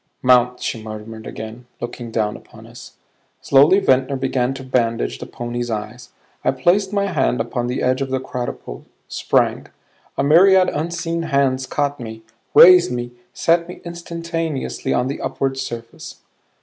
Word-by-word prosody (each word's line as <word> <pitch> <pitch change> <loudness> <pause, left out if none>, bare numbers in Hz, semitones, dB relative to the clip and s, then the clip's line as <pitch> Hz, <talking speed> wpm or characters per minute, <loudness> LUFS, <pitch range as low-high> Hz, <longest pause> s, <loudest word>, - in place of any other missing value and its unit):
"Mount," 125 -1 +4
she 115 - -3
murmured 110 +1 -8
again, 110 +3 -8
looking 120 0 -6
down 110 -2 -1
upon - - -14
us. - - -13 0.5
Slowly 145 +8 +5
Ventnor 135 -7 +2
began 130 -1 0
to 135 - -8
bandage 115 - -1
the - - -7
pony's 120 0 -5
eyes. 110 +2 -5 0.3
I - - +2
placed 175 +10 +2
my 200 -1 +1
hand 135 -9 0
upon 120 +1 -2
the 125 - -2
edge 130 +2 +1
of 135 - -2
the 130 0 -1
quadruple; 120 - -6 0.2
sprang. - - 0 0.5
A - - +1
myriad 185 +5 +6
unseen 165 +2 -3
hands 135 -2 +1
caught 145 -1 -1
me, 110 -2 -8 0.3
raised 180 -5 +8
me, 120 0 -4 0.2
set 170 +5 +1
me 180 - -9
instantaneously 170 -3 -4
on 125 - +1
the 140 - -4
upward 135 -1 -2
surface. 115 -2 -7
130 Hz, 150 wpm, -20 LUFS, 120-165 Hz, 0.5 s, raised